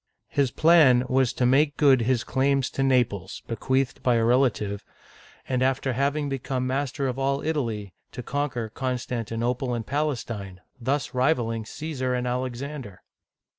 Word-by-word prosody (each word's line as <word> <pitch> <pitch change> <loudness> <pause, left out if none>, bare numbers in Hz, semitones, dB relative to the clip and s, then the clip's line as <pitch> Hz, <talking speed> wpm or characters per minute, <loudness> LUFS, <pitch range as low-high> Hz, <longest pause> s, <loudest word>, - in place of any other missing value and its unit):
His 140 -3 +1
plan 150 -5 +5
was 130 -2 +3
to 125 - 0
make 145 +4 +3
good 135 -4 +5
his 120 0 +1
claims 135 0 +1
to - - -3
Naples, 115 -9 0
— - - -38
bequeathed 130 +2 -1
by 125 -2 +3
a 115 - +2
relative, 115 -5 +1 0.3
— - - -24
and 130 -1 0
after 130 0 +1
having 140 +3 0
become 130 -1 -2
master 135 +1 -1
of 130 +1 -3
all 135 +1 0
Italy, 115 - -2 0.2
to 125 - -6
conquer 130 -5 -2
Constantinople 125 0 -2
and 115 -2 -4
Palestine, 115 -10 -3 0.2
thus 135 +2 -1
rivaling 120 -5 0
Caesar 130 -4 -3
and 125 0 -2
Alexander 125 -3 -4
130 Hz, 150 wpm, -25 LUFS, 120-140 Hz, 0.3 s, plan